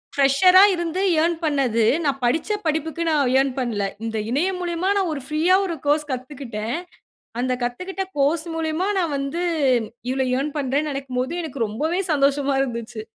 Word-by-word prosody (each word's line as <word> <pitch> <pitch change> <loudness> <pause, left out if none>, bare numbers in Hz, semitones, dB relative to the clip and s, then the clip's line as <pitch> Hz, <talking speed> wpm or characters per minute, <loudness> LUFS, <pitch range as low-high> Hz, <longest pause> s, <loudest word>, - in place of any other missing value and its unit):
ஃபிரஷரா 285 +8 +6
இருந்து 345 +1 -2 0.2
ஏர்ன் 340 +1 +2
பண்ணது, 265 -7 +1 0.2
நான் 275 -2 -1
படிச்ச 305 - 0 0.2
படிப்புக்கு 320 +1 -1
நான் 285 -5 +2
எர்ன் 270 -1 +1
பண்ணல. 225 -6 -1 0.2
இந்த 225 -1 -3
இணையம் 360 +8 0
மூலியமா 345 +1 -1
நான் 375 -5 0
ஒரு 280 - -5
ப்ரீயா 320 +5 +3
ஒரு 345 -3 -3
கோர்ஸ் 300 0 +2
கத்துக்கிட்டேன். 250 -4 -4 0.7
அந்த 255 0 0
கத்துக்கிட்ட 365 +11 -3
கோர்ஸ் 300 +4 +2
மூலியமா, 325 +4 -1
நான் 330 -4 -1
வந்து 275 +6 -3 0.7
இவ்வளவு 260 -1 0
எர்ன் 285 +2 -3
பண்றேன்னு 285 +2 0
நெனைக்கும்போது, 265 +1 -3
எனக்கு 275 -7 -2
ரொம்பவே 315 - -1
சந்தோஷமா 280 -1 +2
இருந்துச்சு. 235 -3 -5
285 Hz, 150 wpm, -22 LUFS, 255-330 Hz, 0.7 s, ஃபிரஷரா